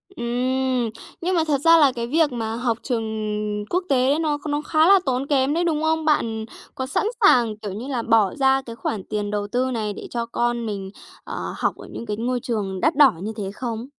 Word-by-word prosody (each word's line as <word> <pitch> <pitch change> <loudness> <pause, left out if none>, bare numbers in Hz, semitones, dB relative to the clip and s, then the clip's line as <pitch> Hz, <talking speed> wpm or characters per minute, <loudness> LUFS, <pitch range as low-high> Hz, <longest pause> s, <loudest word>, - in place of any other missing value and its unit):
Ừm. 250 0 0 0.3
Nhưng 365 +2 0
mà 325 - +3
thật 280 -2 +1
ra 330 +1 +7
là 290 -4 +5
cái 235 -1 -3
việc 305 +2 +2
mà 225 -2 -3
học 235 -1 -1
trường 240 -4 -1 0.7
quốc 360 +2 0
tế 270 +3 +3
nó 300 -2 0
nó 290 +1 0
khá 315 +1 +3
là 395 -1 +7
tốn 260 +1 -1
kém 275 -1 +2
đấy, 340 +2 +1
đúng 315 -3 0
không? 320 0 +1
Bạn 225 -8 +1 0.3
có 260 -2 -3
sẵn 270 - 0 0.2
sàng, 235 - +5
kiểu 210 -2 -6
như 235 +6 -6
là, 255 -4 -2
bỏ 225 -2 +3
ra 270 -1 +3
cái 230 -3 -9
khoản 220 -3 -3
tiền 205 0 -3
đầu 205 -1 -2
tư 255 +4 0
này 215 -3 -2
để - - -8
cho 235 -1 -2
con 235 0 -1
mình, 195 -3 -5 0.3
ờ, - - -5
học - - 0
ở - - -11
những - - -7
cái 210 -2 -3
ngôi 245 +2 -1
trường 205 -6 -3
đắt - - +2
đỏ 280 -4 +7
như 215 +2 -4
thế 195 -2 -4
không? 230 +1 -5
245 Hz, 225 wpm, -23 LUFS, 225-285 Hz, 0.7 s, ra